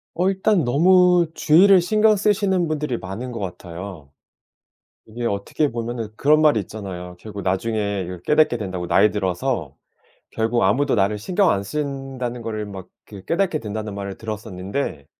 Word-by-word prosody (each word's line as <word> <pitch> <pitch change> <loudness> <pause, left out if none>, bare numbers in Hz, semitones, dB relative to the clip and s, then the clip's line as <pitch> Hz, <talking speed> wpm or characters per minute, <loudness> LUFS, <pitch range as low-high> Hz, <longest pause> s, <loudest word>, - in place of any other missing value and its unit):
어 180 +3 +2
일단 195 -2 +2
너무 180 +6 +4
주위를 185 +5 +6
신경 215 +3 +3
쓰시는 195 -3 +1
분들이 150 -5 -2
많은 110 +7 -6
것 115 - -6
같아요. 90 -4 -8 1.0
이게 120 +2 -5
어떻게 100 +9 -1
보면은 115 -1 -4
그런 150 +2 +4
말이 150 -9 +4
있잖아요. 90 -3 -7
"결국 100 -1 -8
나중에 100 +1 -1
이걸 90 0 -7
깨닫게 150 - +3
된다."고 95 -5 -4
"나이 95 +4 +4
들어서 95 - -2 0.6
결국 115 +2 0
아무도 130 +9 +2
나를 105 0 +1
신경 185 - +2
안 100 - 0
쓴다는 135 -1 -4
거를 110 -2 -4
막 95 -3 -9 0.2
그 100 -3 -12
깨닫게 175 -2 0
된다."는 105 -2 -5
말을 100 -1 -6
들었었는데 105 - -5
115 Hz, 340 characters per minute, -22 LUFS, 100-155 Hz, 1.0 s, 주위를